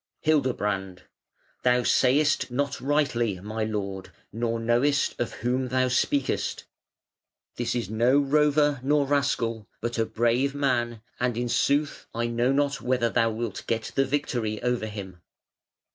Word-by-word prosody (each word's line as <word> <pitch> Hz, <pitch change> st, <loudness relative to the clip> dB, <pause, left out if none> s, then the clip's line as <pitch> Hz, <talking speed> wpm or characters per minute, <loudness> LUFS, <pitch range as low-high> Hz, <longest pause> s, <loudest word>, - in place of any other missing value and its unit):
Hildebrand: 105 Hz, -, 0 dB, 0.6 s
"Thou 125 Hz, 0 st, +3 dB
sayest 145 Hz, +5 st, +3 dB
not 140 Hz, +2 st, -2 dB
rightly, 125 Hz, -8 st, 0 dB
my 110 Hz, +3 st, -4 dB
lord, 100 Hz, -3 st, -4 dB, 0.2 s
nor 115 Hz, +1 st, -1 dB
knowest 120 Hz, +5 st, +2 dB
of 120 Hz, -, -1 dB
whom 130 Hz, +1 st, +1 dB
thou 130 Hz, 0 st, +1 dB
speakest. 130 Hz, +2 st, 0 dB, 0.9 s
This 120 Hz, 0 st, -1 dB
is 120 Hz, -5 st, -2 dB
no 120 Hz, +5 st, +3 dB
rover 145 Hz, 0 st, +3 dB
nor 145 Hz, +2 st, +2 dB
rascal, 125 Hz, -6 st, 0 dB
but 120 Hz, 0 st, -3 dB
a 115 Hz, -, +2 dB
brave 120 Hz, +4 st, +1 dB
man; 120 Hz, -5 st, 0 dB, 0.2 s
and 125 Hz, -2 st, 0 dB
in 120 Hz, 0 st, -1 dB
sooth 145 Hz, +4 st, +1 dB
I 115 Hz, 0 st, 0 dB
know 120 Hz, +2 st, +1 dB
not 140 Hz, 0 st, 0 dB
whether 125 Hz, -2 st, +1 dB
thou 115 Hz, -1 st, +2 dB
wilt 115 Hz, -1 st, -4 dB
get 115 Hz, -1 st, -2 dB
the 135 Hz, -, +2 dB
victory 120 Hz, -6 st, -2 dB
over 125 Hz, -3 st, 0 dB
him". 95 Hz, -4 st, -8 dB
120 Hz, 140 wpm, -26 LUFS, 115-140 Hz, 0.9 s, Thou